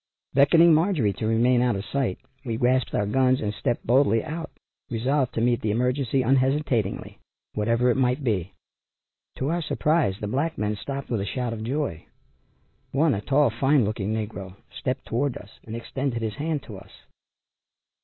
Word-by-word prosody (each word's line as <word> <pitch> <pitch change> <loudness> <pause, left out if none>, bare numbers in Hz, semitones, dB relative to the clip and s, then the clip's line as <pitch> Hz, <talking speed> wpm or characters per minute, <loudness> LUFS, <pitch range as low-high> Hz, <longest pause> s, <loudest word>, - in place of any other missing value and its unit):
Beckoning 165 +5 +6
Marjorie 155 - +2
to 110 - -3
remain 120 +2 +3
out 125 -2 +2
of 100 +1 -4
sight 135 -9 -1 0.3
we 115 -4 -3
grasped 125 +1 +1
our 105 - +1
guns 130 +4 +2
and 105 -1 -2
stepped 120 +1 -2
boldly 120 -2 +3
out, 160 +1 -5 0.4
resolved 130 +3 0
to 115 - 0
meet 120 -1 +2
the 110 - -1
emergency 125 +3 +1
unhesitatingly, 130 -4 0 0.3
whatever 115 +3 +2
it - - 0
might 130 +2 +1
be. 100 -7 -1 0.8
To 135 - -1
our 170 +1 0
surprise 150 - +1
the - - -4
black 140 +10 -1
men 105 0 -1
stopped 140 +5 -6
with 110 -4 0
a - - -2
shout 125 +1 -2
of 110 -1 -6
joy. 130 - -3 0.8
One 150 +3 +3
a 100 - -2
tall, 140 +2 +3
fine 135 +2 +3
looking 105 -1 -2
negro, 105 -4 -4 0.2
stepped 130 0 -3
toward 130 +3 -1
us 105 - -15
and 110 - -6
extended 120 0 -3
his 110 +1 -3
hand 150 -1 -2
to 105 - -9
us. 95 +1 -14
125 Hz, 175 wpm, -25 LUFS, 110-140 Hz, 0.8 s, Beckoning